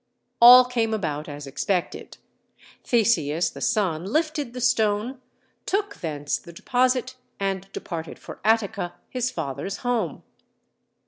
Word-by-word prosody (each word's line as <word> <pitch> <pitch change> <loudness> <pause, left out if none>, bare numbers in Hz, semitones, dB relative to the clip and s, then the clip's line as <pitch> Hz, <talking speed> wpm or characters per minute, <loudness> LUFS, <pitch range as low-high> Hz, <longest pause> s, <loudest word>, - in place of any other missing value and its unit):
All 250 +1 +10
came 230 -3 0
about 155 -6 -3
as 145 0 -7
expected. 170 +7 -3 0.7
Theseus, 180 - +2
the - - -10
son, 185 -8 0
lifted 300 - -1
the 250 - -6
stone, 235 +1 +1 0.5
took 400 +1 -1
thence 145 -3 -3
the 170 - -13
deposit 255 +6 0 0.2
and 195 -1 -3
departed 165 -2 -6
for - - -11
Attica, 210 -5 +1 0.2
his 250 -1 -1
father's 165 - -4
home. 245 -2 -1
215 Hz, 120 wpm, -24 LUFS, 170-250 Hz, 0.7 s, All